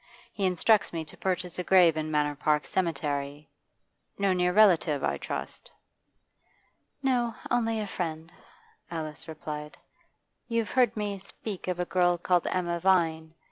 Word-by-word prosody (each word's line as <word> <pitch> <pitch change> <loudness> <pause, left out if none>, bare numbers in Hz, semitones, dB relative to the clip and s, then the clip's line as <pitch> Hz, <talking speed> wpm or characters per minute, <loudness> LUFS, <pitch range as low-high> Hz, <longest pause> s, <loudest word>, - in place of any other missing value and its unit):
He 195 -2 0
instructs 195 +4 +3
me 165 -2 -4
to 150 - -12
purchase 180 -2 -3
a - - -1
grave 180 -4 +5
in 155 0 -2
Manor 150 -1 +1
Park 150 +1 +1
Cemetery. 145 -4 -2 0.7
No 200 -1 +2
near 180 0 +2
relative, 180 -8 +4
I - - 0
trust?' - - -6 1.3
'No, 240 -4 +1 0.2
only 225 -2 +1
a 215 - -2
friend,' 165 -4 -4 0.6
Alice 155 -2 -6
replied. 150 -1 -7 0.7
'You've 230 -4 -1
heard 245 -2 +3
me 205 -2 -2
speak 200 0 -7
of 180 -1 -2
a 180 - 0
girl 175 0 +2
called 175 0 +1
Emma 175 -2 -1
Vine. 165 -3 +1
175 Hz, 140 wpm, -28 LUFS, 160-200 Hz, 1.3 s, grave